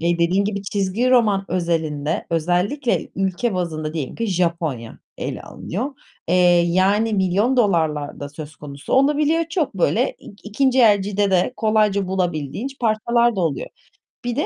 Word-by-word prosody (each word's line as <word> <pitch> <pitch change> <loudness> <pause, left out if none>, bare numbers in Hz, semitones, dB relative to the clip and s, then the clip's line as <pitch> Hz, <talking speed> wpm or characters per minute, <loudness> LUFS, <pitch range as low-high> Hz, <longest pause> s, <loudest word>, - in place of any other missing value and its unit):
Dediğin 170 +3 +1
gibi, 200 -1 -3
çizgi 200 +5 0
roman 215 -6 +3
özelinde 160 -3 -1
özellikle 180 - 0
ülke 195 +3 -1
bazında 160 -4 -3
diyelim 145 -6 -4
ki 230 - -2
Japonya 170 - -2 0.2
ele - - -4
alınıyor. 245 +11 -5 0.4
Eee, 180 - +2 0.3
yani 200 +5 +2
milyon 200 +7 +1
dolarlar 160 -9 +1
da 145 - -5
söz 150 +1 -10
konusu 140 -1 -8
olabiliyor. 300 +4 +3
Çok 325 -2 -1
böyle - - +1
ik 205 - -14
ikinci 260 +4 +2
elcide 205 -2 +3
de 185 +6 +2
kolayca 210 -3 +2
bulabildiğin 175 - -2
ç 270 - -15
parçalar 235 0 +2
da - - 0
oluyor. 160 -5 -1 0.6
Bir 245 -1 -2
de 295 - 0
195 Hz, 145 wpm, -21 LUFS, 170-230 Hz, 0.6 s, roman